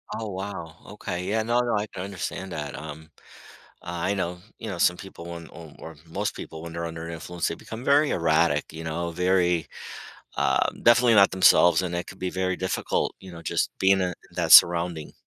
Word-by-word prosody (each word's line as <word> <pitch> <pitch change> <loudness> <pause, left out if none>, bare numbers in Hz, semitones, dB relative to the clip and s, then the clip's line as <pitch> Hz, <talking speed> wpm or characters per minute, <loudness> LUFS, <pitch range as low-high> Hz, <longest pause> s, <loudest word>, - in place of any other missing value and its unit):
Oh, 110 -2 -5
wow. 95 -4 -6 0.2
Okay, 90 -3 -5
yeah. 110 +3 0
No, 120 +2 +1
no, 120 -2 0
I 105 +1 -1
can 90 - -7
understand 95 -1 -5
that, 75 -2 -5
um, 80 +1 -9 0.7
I 85 +3 -2
know, 90 -2 -3 0.2
you 110 - -7
know, 95 - -4
some 90 +1 +3
people 95 -2 -11
when 85 -1 -8
or 80 -1 -12
or 80 -1 -9
most 80 - -3
people 80 - -8
when 85 0 -8
they're 85 0 -4
under 80 0 -6
influence, 85 +1 -4
they 85 - -3
become 110 +7 -9
very 145 +2 +3
erratic, 80 -2 +1
you 80 +1 -8
know, 85 +2 -3
very 90 -1 +1 0.7
um, 65 - +1
definitely 120 0 +5
not 100 -2 +6
themselves, 95 -1 +5
and 90 -1 -3
it 85 - -3
could 95 - -11
be 90 -1 -3
very 95 0 -1
difficult, 95 - -1
you 95 - -11
know, 85 -1 -10
just - - -1
being 95 0 +4
in 90 - +1
in 90 - -5 0.2
that - - +1
surrounding. 85 -2 +6
90 Hz, 200 wpm, -25 LUFS, 85-95 Hz, 0.7 s, not